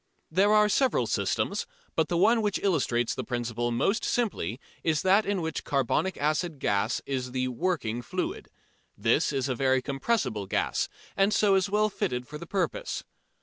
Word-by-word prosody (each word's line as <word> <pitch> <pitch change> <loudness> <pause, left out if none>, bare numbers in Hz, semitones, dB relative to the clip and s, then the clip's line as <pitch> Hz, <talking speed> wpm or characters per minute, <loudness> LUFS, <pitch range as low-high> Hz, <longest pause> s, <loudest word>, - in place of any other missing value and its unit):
There 195 +5 +4
are 210 0 +6
several 260 +5 +2
systems, - - -1 0.3
but 160 -1 +2
the 175 - 0
one 225 +6 +4
which 210 -2 0
illustrates 130 - +1
the 130 - -4
principle 120 -1 -2
most 155 - +1
simply 140 - -1 0.2
is 160 0 +1
that 195 +3 +4
in 200 -2 0
which 160 -1 -3
carbonic 140 +7 0
acid 155 +2 0
gas 100 -1 0
is 125 -2 -3
the 130 0 0
"working 125 -5 -1
fluid." - - -4 0.5
This - - +2
is 135 -1 -1
a 130 - 0
very 130 +1 +2
compressible 135 - -1
gas, - - 0 0.3
and 195 +1 +3
so 210 -1 +3
is 195 +1 +2
well 210 +1 +2
fitted 125 - -2
for 150 0 -8
the 170 - -9
purpose. - - -2
155 Hz, 170 wpm, -28 LUFS, 125-200 Hz, 0.5 s, are